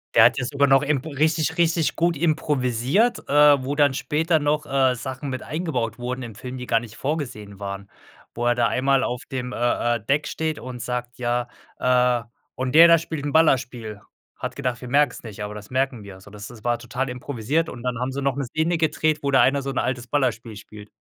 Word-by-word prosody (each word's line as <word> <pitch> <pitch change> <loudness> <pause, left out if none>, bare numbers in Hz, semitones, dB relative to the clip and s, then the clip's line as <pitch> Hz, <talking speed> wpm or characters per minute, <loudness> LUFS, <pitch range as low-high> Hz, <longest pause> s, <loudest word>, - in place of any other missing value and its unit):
Der - - +8
hat - - +4
jetzt 125 - -3
sogar 140 0 +3
noch 135 0 +5
emp 145 -2 -1
richtig 155 +2 0
richtig 165 -1 +2
gut 170 -1 +1
improvisiert, 150 - +1
äh, 145 -1 +6
wo 140 +2 -2
dann 145 -2 +3
später 160 +4 +1
noch, 150 +1 0
äh, 135 -2 +2
Sachen 130 +3 -6
mit 130 -1 -4
eingebaut 130 -9 -3
wurden 125 +1 -4
im 115 -2 -8
Film, 125 +4 -7
die 125 - -6
gar 115 - +2
nicht 115 -2 -11
vorgesehen 120 -9 -4
waren. 100 0 -6 0.4
Wo 120 - -3
er 120 - +3
da 120 -1 +2
einmal 135 +2 +2
auf 125 +1 -3
dem, 125 -1 -4
äh-äh, 120 0 0
Deck 145 +2 +1
steht 160 -1 -2
und 125 -1 -7
sagt: 125 +1 -4
„Ja 120 0 -1 0.3
äh, 125 -1 +2 0.3
und 130 0 -3
der 165 +2 +9
da 170 0 +7
spielt 160 -2 -5
'n 145 - -3
Ballerspiel. 125 -9 +1 0.3
Hat - - -5
gedacht, 125 -3 -2
wir 125 - -7
merken 145 +3 +3
es - - -10
nicht, 110 -2 -7
aber 105 0 -5
das 105 0 -10
merken 130 -2 -1
wir." 100 -1 -10
Also 95 +1 -15
das 105 0 -9
das 115 -3 -13
war 120 -1 0
total 125 +3 -3
improvisiert 130 +5 -2
und 120 - -9
dann 125 -2 -2
haben 125 +1 -2
sie 140 +1 -4
noch 135 -2 +1
'ne 140 -1 -2
Szene 160 +7 0
gedreht, 155 -1 +1
wo 140 - -1
da 135 -1 +5
einer 140 +1 +3
so 135 - -4
'n 135 - -4
altes 125 -1 -1
Ballerspiel 115 -4 -1
spielt. 105 0 -12
130 Hz, 225 wpm, -23 LUFS, 120-145 Hz, 0.4 s, der